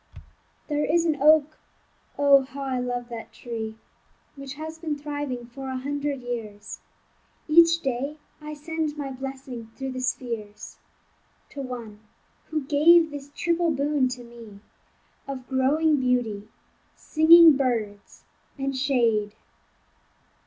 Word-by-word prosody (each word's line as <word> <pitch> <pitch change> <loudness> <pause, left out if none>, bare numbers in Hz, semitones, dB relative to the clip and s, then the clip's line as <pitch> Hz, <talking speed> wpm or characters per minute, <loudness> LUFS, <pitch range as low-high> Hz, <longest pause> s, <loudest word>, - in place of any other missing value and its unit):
There 295 -1 0
is 335 +2 +2
an 305 -4 0
oak 310 0 +4 0.6
(oh! 280 -1 +6
how 275 +1 -8
I 260 -2 -2
love 245 -1 -3
that 230 -1 -8
tree) 225 -1 -6 0.6
Which 275 -1 -8
has 315 +2 -7
been 310 -3 -3
thriving 290 -4 -5
for 265 +3 -8
a 260 - -3
hundred 285 0 -3
years; 215 -4 -6 0.7
Each 335 +1 +6
day 270 +2 -3 0.2
I 300 0 -7
send 310 0 -3
my 280 -2 -4
blessing 260 -3 -7
through 270 -1 -5
the 255 - -5
spheres 235 -4 -5 0.7
To 280 - -6
one 235 -5 -7 0.5
who 310 -2 -2
gave 315 +4 +5
this 285 -1 -8
triple 340 0 +1
boon 285 -2 +1
to 250 -1 -6
me, 230 -4 -13 0.7
Of 265 -2 -6
growing 290 +4 +2
beauty, 235 -5 -1 0.5
singing 325 0 +7
birds, 225 -7 -3 0.3
and 270 0 -2
shade. 230 -6 +1
270 Hz, 125 wpm, -25 LUFS, 245-295 Hz, 0.7 s, singing